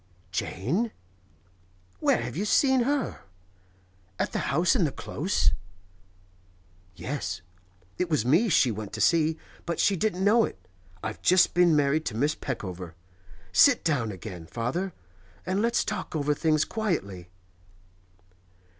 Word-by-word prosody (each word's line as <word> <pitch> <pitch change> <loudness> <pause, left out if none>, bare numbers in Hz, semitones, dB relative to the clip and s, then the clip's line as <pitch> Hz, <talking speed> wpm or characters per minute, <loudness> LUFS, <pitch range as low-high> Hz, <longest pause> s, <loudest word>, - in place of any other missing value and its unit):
'Jane? 170 - -1 1.1
Where 115 - +2
have 125 +2 -5
you 190 - -1
seen 265 +5 +3
her? 285 0 -1 1.0
At - - -1
the - - -2
house - - +3
in - - +3
the - - +1
Close?' - - 0 1.4
'Yes. 95 -8 -4 0.6
It 180 - 0
was 150 -8 +1
me 170 - +4
she 135 -7 +4
went 105 -1 -6
to 110 - -5
see, 160 +4 +3 0.3
but 170 -1 -3
she 200 - +3
didn't 190 0 -1
know 220 +3 +5
it. - - -4 0.5
I've 110 -1 -5
just 180 0 +4
been 175 -2 +4
married 150 +2 +2
to 110 - -3
Miss 145 +5 +2
Peckover. 90 - -6 0.6
Sit 280 -4 +6
down 130 -9 0
again, 90 -3 -8
father, 130 - -2 0.5
and 185 +3 0
let's 235 +1 +1
talk - - -4
over 150 -1 +1
things 155 0 +2
quietly. 100 - -3
155 Hz, 135 wpm, -27 LUFS, -, 1.4 s, Sit